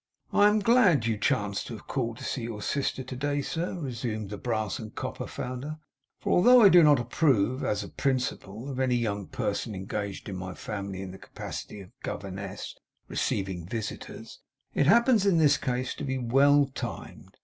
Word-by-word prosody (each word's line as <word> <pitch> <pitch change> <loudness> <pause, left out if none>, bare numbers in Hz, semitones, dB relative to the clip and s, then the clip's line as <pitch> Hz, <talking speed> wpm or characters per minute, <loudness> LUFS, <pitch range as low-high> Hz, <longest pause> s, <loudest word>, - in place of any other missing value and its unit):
'I 205 - +6
am 210 +1 +3
glad 200 - +4
you 115 -1 +1
chance 100 -3 0
to 115 - -7
have - - -16
called 115 -4 -2
to - - -9
see 130 - -3
your 115 -3 -5
sister 135 -1 -1
to 130 0 -7
day, 145 +2 -1
sir,' 170 +6 -3
resumed 115 - -4
the 105 - -4
brass 110 -4 -2
and 110 -2 -9
copper - - -4
founder. 130 +5 -5 0.4
'For - - -2
although 245 +6 +7
I 200 - +9
do 175 -1 +8
not 150 -4 +6
approve, 125 -1 +1
as 105 -1 0
a - - -7
principle, 125 -4 -2
of 135 -2 -4
any 130 -2 +2
young 105 -5 -1
person 110 -3 -2
engaged 100 +1 -4
in 100 - -5
my 95 0 -6
family 100 -2 -5
in 95 - -7
the 95 - -11
capacity 105 - -7
of 95 - -12
a - - -33
governess, 100 0 -6 0.3
receiving 95 -3 -2
visitors, 110 +1 -6 0.3
it 140 - +2
happens 235 - +5
in 185 -4 +4
this 145 -3 +5
case 125 0 -2
to - - -7
be 130 -2 -1
well 140 +4 +4
timed. - - -7
125 Hz, 190 wpm, -28 LUFS, 105-145 Hz, 0.4 s, I